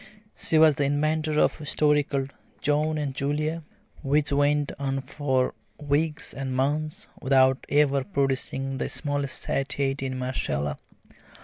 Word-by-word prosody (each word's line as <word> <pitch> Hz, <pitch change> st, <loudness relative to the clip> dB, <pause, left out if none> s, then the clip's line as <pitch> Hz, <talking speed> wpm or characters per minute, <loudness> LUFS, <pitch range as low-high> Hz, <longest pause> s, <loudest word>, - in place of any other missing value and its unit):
She 160 Hz, -, +2 dB
was 155 Hz, -3 st, +6 dB
the 145 Hz, -, +1 dB
inventor 155 Hz, +2 st, +1 dB
of -, -, +2 dB
a -, -, -7 dB
story 150 Hz, 0 st, +3 dB
called 140 Hz, -2 st, -3 dB, 0.3 s
"John 150 Hz, +2 st, +1 dB
and 145 Hz, -3 st, -2 dB
Julia," 150 Hz, +4 st, -1 dB, 0.4 s
which 145 Hz, +2 st, +1 dB
went 145 Hz, 0 st, +2 dB
on 135 Hz, -1 st, -1 dB
for 130 Hz, -2 st, -1 dB, 0.3 s
weeks 150 Hz, +2 st, -1 dB
and 135 Hz, -1 st, -4 dB
months 150 Hz, +4 st, -1 dB, 0.2 s
without 130 Hz, -1 st, +3 dB
ever 140 Hz, -2 st, +3 dB
producing 135 Hz, -4 st, -1 dB
the -, -, -2 dB
smallest 145 Hz, -2 st, -2 dB
satiety 135 Hz, -1 st, -1 dB
in 130 Hz, 0 st, -4 dB
Marcella. 105 Hz, -, -2 dB
145 Hz, 135 wpm, -26 LUFS, 135-150 Hz, 0.4 s, was